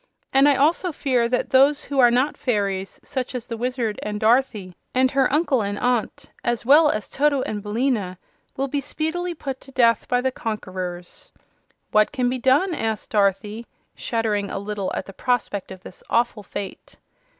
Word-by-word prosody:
"And 275 +2 +6
I 285 - +4
also 325 +6 +2
fear 250 -5 0
that 250 - -1
those 280 +3 +4
who 280 -2 -3
are 245 -2 +7
not 255 +5 +1
fairies, 200 -5 -2
such 260 -2 -4
as 245 - -4
the 230 - -5
Wizard, 240 -2 -2
and 210 0 -4
Dorothy, 220 -5 +1 0.2
and 260 0 +3
her 270 -2 +2
uncle 290 -4 +2
and 205 0 -3
aunt, 250 +4 -1
as 240 -1 -1
well 295 +4 +7
as 215 -6 -2
Toto 285 -2 +1
and 210 -1 -4
Billina, 210 -3 -1 0.4
will 270 +1 0
be 280 +1 -2
speedily 330 +5 -3
put 270 -4 -6
to 270 - -12
death 230 -4 +3
by 245 - +2
the 260 +1 0
conquerors." 185 -6 -6 0.6
"What 215 0 +4
can 255 -4 0
be 255 +1 -2
done?" 280 +9 +3
asked 220 -7 -3
Dorothy, 210 +2 0 0.3
shuddering 215 -4 -1
a - - -4
little 200 -1 -3
at - - -3
the 195 - -11
prospect 215 -5 -1
of 185 -1 -10
this - - -11
awful 235 -2 +1
fate. 195 -1 -8
245 Hz, 180 wpm, -23 LUFS, 210-270 Hz, 0.6 s, are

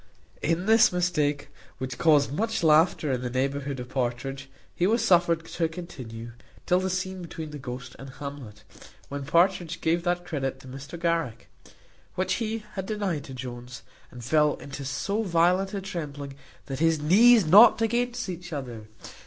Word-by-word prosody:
In 170 +3 0
this 225 +2 +6
mistake, 150 -5 0 0.3
which 130 0 -5
caused 145 -4 +4
much 225 +3 -1
laughter 155 -1 +4
in 125 -1 -1
the 125 - -3
neighbourhood 135 +2 -2
of 125 0 -7
Partridge, 135 +1 -3 0.2
he 175 - +1
was 230 +3 +2
suffered 170 -2 +3
to 165 0 -1
continue, 125 -10 -8 0.3
till 180 - +3
the 190 0 -1
scene 185 0 -3
between 160 -2 -7
the 150 - -7
ghost 125 -1 -7
and 135 - -9
Hamlet, 130 -6 -9 0.5
when 140 -1 -5
Partridge 170 +1 +2
gave 165 +2 +1
that 175 0 -1
credit 135 -4 -3
to 130 - -14
Mr 135 +6 -9
Garrick, 165 -9 -1 0.7
which 185 0 0
he 225 0 -2
had 190 -1 -5
denied 200 -9 -2
to 135 - -9
Jones, 125 -1 -8 0.3
and 125 -1 -11
fell 150 +2 +3
into 140 0 -8
so 200 +10 -2
violent 185 +1 +2
a 195 - -3
trembling, 145 -7 -6 0.3
that 135 -1 -5
his 165 -1 +2
knees 215 +7 +6
knocked 215 +7 +7
against 245 +1 -1
each 180 -1 -7
other. 120 -7 -6
160 Hz, 165 wpm, -26 LUFS, 135-185 Hz, 0.7 s, knocked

